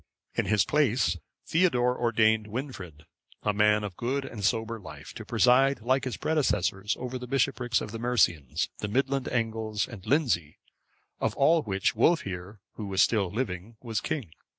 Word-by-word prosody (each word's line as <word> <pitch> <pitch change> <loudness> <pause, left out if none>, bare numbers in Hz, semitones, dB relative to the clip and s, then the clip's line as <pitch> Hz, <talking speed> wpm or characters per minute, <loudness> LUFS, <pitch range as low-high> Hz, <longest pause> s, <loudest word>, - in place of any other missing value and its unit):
In - - 0
his 105 -2 +3
place, 125 - +2 0.3
Theodore 125 -8 +2
ordained 110 -2 +2
Wynfrid,(555) 100 - -7 0.4
a 105 - +1
man 105 +1 +3
of 100 -4 -5
good 135 +6 -2
and 110 -6 -7
sober 115 +2 0
life, 75 -7 -10
to - - -8
preside, 135 +3 +4
like 130 +4 +1
his 130 - -3
predecessors, 105 - 0
over 125 0 -4
the 125 - -7
bishoprics 125 -3 +1
of 105 - -6
the 115 - -6
Mercians, 85 - +1
the 105 - -2
Midland 135 +4 0
Angles, 110 -3 -1
and 110 -6 -10
Lindsey, 115 - +1 0.6
of 110 0 -1
all 160 +4 +4
which, 95 -6 0
Wulfhere, 100 - 0 0.2
who 105 - -5
was 95 -1 +3
still 100 -5 +1
living, 105 -1 -4
was 115 -3 -3
king. 125 - -3
115 Hz, 160 wpm, -28 LUFS, 100-130 Hz, 0.6 s, preside